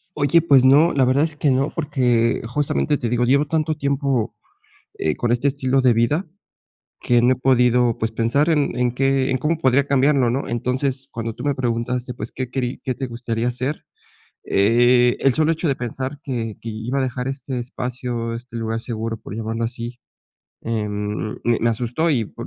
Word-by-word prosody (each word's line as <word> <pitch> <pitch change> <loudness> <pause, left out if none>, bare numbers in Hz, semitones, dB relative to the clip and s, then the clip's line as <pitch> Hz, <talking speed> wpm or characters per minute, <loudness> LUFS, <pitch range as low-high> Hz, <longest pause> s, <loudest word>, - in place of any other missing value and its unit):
Oye, 150 +3 +3
pues 140 -5 +5
no, 145 +6 +6
la 135 -2 +3
verdad 135 +4 +3
es 160 -2 -2
que 150 -1 +1
no, 135 +4 +1
porque 125 -7 +1
justamente 145 +2 0
te 120 - -3
digo, 120 0 +1
llevo 140 +4 +3
tanto 155 +1 0
tiempo, 140 -4 -1 0.7
eh, 75 -1 0
con 120 0 0
este 125 +4 +2
estilo 135 -1 +1
de 125 -2 +4
vida 120 - +1 0.7
que 120 -1 +3
no 125 +2 +4
he - - -14
podido, 125 -2 +3
pues, 110 0 -2
pensar 120 +8 +1
en 150 -3 +1
en 125 -1 +1
qué 135 +1 +1
en 130 - +1
cómo 155 +5 0
podría 135 0 +3
cambiarlo, 135 -2 +3
¿no? 135 +3 -2
Entonces, 130 +3 -2
cuando 115 -1 -4
tú - - -8
me 145 - +1
preguntaste, 125 0 -2
pues, 115 -1 -7
qué 130 -1 -5
querí 125 -1 -3
qué 130 -2 -2
te 135 - -4
gustaría 115 0 -3
hacer, 130 +5 -3 0.6
eh, 120 +4 +4
el 135 -2 +3
solo 155 +1 +2
hecho 165 +1 -1
de 140 - +1
pensar 130 +3 -5
que 115 -6 -4
que 115 - -6
iba 115 +5 -3
a - - +1
dejar 125 -1 -3
este 135 -1 -4
espacio, 120 -1 -4
este 120 0 -10
lugar 115 0 -2
seguro, 115 -1 -4
por 105 - -9
llamarlo 115 +1 -2
así, 120 +1 -6 0.6
em, 105 -1 -3
me 120 -1 +2
me 115 +1 +2
asustó, 125 +8 -1
y 120 -6 +1
por - - -9
125 Hz, 190 wpm, -21 LUFS, 115-140 Hz, 0.7 s, no